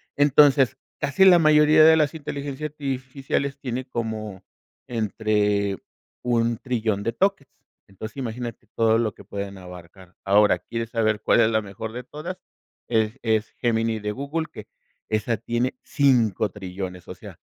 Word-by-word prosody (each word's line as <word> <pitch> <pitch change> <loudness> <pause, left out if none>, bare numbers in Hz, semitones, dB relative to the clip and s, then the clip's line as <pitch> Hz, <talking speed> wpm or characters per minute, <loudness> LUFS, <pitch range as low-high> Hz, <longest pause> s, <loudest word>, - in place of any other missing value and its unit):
Entonces, 145 -3 +5 0.2
casi 145 +7 +2
la 180 -2 +8
mayoría 155 0 +6
de 160 +1 +8
las 150 -1 +2
inteligencias 145 -1 -5
artificiales 135 0 -3
tiene 130 -1 -4
como 110 -5 -5 0.4
entre 105 -3 0 0.5
un 115 -1 +1
trillón 110 -5 -2
de 115 - -1
tokens. 190 - 0 0.4
Entonces, 110 +5 -9
imagínate 120 -2 -5
todo 115 0 +3
lo 115 -3 0
que - - -15
pueden 100 -1 -6
abarcar. 90 0 -13
Ahora, 105 +2 +4
¿quieres 115 -1 -5
saber 110 -2 +1
cuál - - +3
es 110 - +4
la 110 0 +2
mejor 105 +2 -7
de 125 +1 -6
todas? 155 +8 -7 0.5
Es 110 +2 0
es 110 -1 0
Gemini 115 -2 0
de 105 0 -3
Google, 140 +7 -3
que - - -10 0.4
esa 110 +1 0
tiene 120 +3 -2
cinco 120 -7 +2
trillones, 95 -2 -7
o - - -6
sea, - - -12
115 Hz, 145 wpm, -24 LUFS, 105-140 Hz, 0.5 s, la